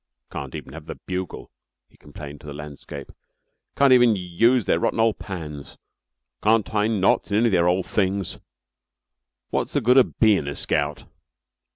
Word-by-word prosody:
"Can't 70 -2 -6
even 65 - -8
have 80 0 -10
the - - -6
bugle," 95 -1 -5 0.4
he - - -28
complained 75 0 -11
to - - -13
the 70 - -6
landscape. 75 -1 -9 0.6
"Can't 140 -2 +5
even 120 -3 +5
use 100 +6 +2
their 85 - +2
rotten 115 - 0
ole 115 -1 +4
pans. 75 -9 -8 0.6
Can't 110 0 +3
tie 105 -1 0
knots 105 -4 +2
in 100 - +1
any 115 - +3
of 115 - +3
their 85 -2 +3
ole 90 +2 +2
things. 95 -1 -1 1.1
Wot's - - -1
the - - +2
good 125 +3 +4
of 130 - +3
bein' 105 -10 +4
a 70 - -4
scout?" 75 0 -1
95 Hz, 170 wpm, -23 LUFS, 75-110 Hz, 1.1 s, Can't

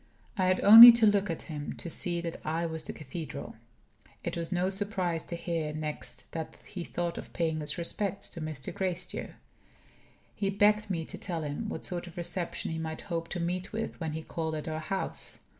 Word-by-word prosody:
I 185 -3 +1
had 185 0 +2
only 230 +4 +13
to 230 -1 +4
look 205 -1 +3
at 165 - -3
him 150 -2 -5
to - - -8
see 170 +1 -1
that 170 -1 -5
I 165 +2 -1
was 160 -1 -4
the - - -4
cathedral. 150 +2 -7 0.7
It - - -3
was 170 0 -4
no 180 +1 +1
surprise 190 -4 +1
to 170 - -4
hear 165 -3 -3
next 155 -1 -3
that 160 -1 -6
he 180 -3 -6
thought 170 0 -3
of - - -10
"paying 160 -2 0
his 150 0 -3
respects 200 +3 -3
to 170 - -7
Mr. 155 -4 -5
Gracedieu." 185 -1 -3 1.0
He 200 - -1
begged 210 +1 +3
me 165 -4 -2
to - - -7
tell 170 -4 -3
him 150 +9 -4
what - - -5
sort 175 -1 -3
of 175 - -13
reception 175 -1 -3
he 160 - -3
might 160 -1 -4
hope 165 -1 -2
to 175 - -3
meet 180 +2 -2
with 225 +1 -4
when 160 -3 -3
he 160 0 -5
called 160 -1 -3
at 155 - -5
our 155 0 -3
house. 190 +5 -3
170 Hz, 205 wpm, -30 LUFS, 160-190 Hz, 1.0 s, only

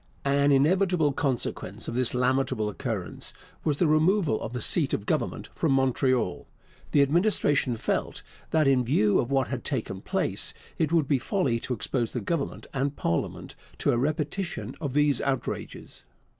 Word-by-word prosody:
An 140 +1 +3
inevitable 160 +2 +3
consequence 135 -3 -2
of - - -3
this 125 0 0
lamentable 125 -3 +1
occurrence 105 -4 -4 0.3
was 150 -2 +1
the 175 - +3
removal 155 - +3
of 110 - -4
the 125 - -2
seat - - +2
of - - -6
government - - -2
from - - +1
Montreal. 130 -5 +1 0.4
The 145 - +5
Administration 145 - +2
felt - - -2 0.3
that, 155 -2 +3
in 130 -2 +4
view 110 -5 +3
of 120 - -1
what 135 -1 +1
had 130 -3 -4
taken 110 -9 -3
place, - - -1 0.2
it 155 -1 +1
would 165 -5 +3
be 140 -3 +2
folly 130 - 0
to 125 - -2
expose 120 +1 -2
the 125 - -1
Government 140 +7 -3
and 140 +1 -1
parliament 85 0 -2 0.2
to - - +1
a - - +1
repetition 150 - -2
of 140 -4 -3
these 145 -3 +3
outrages. 135 -1 -4
135 Hz, 160 wpm, -27 LUFS, 125-150 Hz, 0.4 s, The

